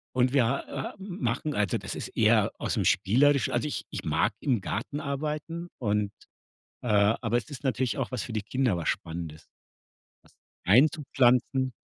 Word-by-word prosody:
und 125 0 +2
wir 130 -5 +4
h 135 +4 -1
h 135 - -5
machen 155 - -3
also, 105 -4 +1
das - - -5
ist - - -5
eher - - +4
aus'm - - -1
Spielerisch 140 +7 +3
also 120 +5 0
ich - - -4
ich - - -5
mag - - +1
im 125 -7 0
Garten 110 +10 -3
arbeiten 150 +4 -4
und, 105 -3 0 0.7
äh, 125 - -6
aber 110 +3 +2
es 110 - -4
ist 140 -2 -8
natürlich 130 -1 0
auch 135 -2 -2
was 125 - -2
für 120 - -7
die 110 - -1
Kinder, 120 -4 0
was 85 - -4
Spannendes, 80 -1 -5 0.8
was - - -24 0.3
einzupflanzen. 130 -3 +3
125 Hz, 165 wpm, -28 LUFS, 110-140 Hz, 0.8 s, wir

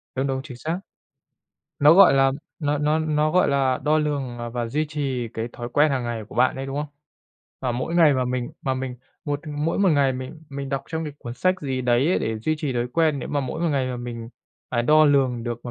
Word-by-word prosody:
Đúng, 135 +1 0
đúng, 135 -1 -1
chính 130 -5 -9
xác. 160 +7 -3 1.0
Nó, 150 +2 +7
gọi 190 -6 +8
là, 135 0 +4 0.3
nó 150 -2 0
nó 150 +2 +1
nó, 155 -1 +1
gọi 180 - +4
là, 135 -2 +2
đo 155 +1 +3
lường, 140 -5 -2
ờ, 120 0 -5
và 120 0 -3
duy 150 +7 -1
trì 135 -5 -2
cái 115 +1 -3
thói 120 0 -6
quen 145 +4 +3
hàng 130 -2 -1
ngày 120 -2 -3
của - - -13
bạn 130 +1 +3
ấy, 135 +1 -4
đúng 135 0 -5
không? 150 0 -2 0.7
Và 125 - -1
mỗi 130 +8 -3
ngày 160 -4 +6
mà 130 -1 +1
mình 125 -1 -2
mà 130 - 0
mình 130 -1 -4 0.3
một 145 -2 -2
mỗi 150 +2 -2
một 200 -1 +4
ngày 140 -5 +3
mình 130 +5 -7
mình 140 0 -5
đọc 135 -1 -2
trong 160 0 -3
cái 150 - -5
cuốn 120 0 -7
sách 185 +9 +2
gì 130 -3 -2
đấy 125 +3 +2
ấy, 185 - +2
để 110 0 -2
duy 155 +9 0
trì 145 -3 -2
thói 120 -1 -1
quen, 155 -2 +2
nếu - - -5
mà 145 - 0
mỗi 135 +4 -4
một 170 - +1
ngày 135 -3 0
mà 125 -1 -3
mình 120 -1 -6 0.4
phải 120 -2 +1
đo 155 +5 +5
lường 135 -5 +2
được 120 -1 -5
mà 120 - -5
135 Hz, 250 wpm, -24 LUFS, 125-150 Hz, 1.0 s, gọi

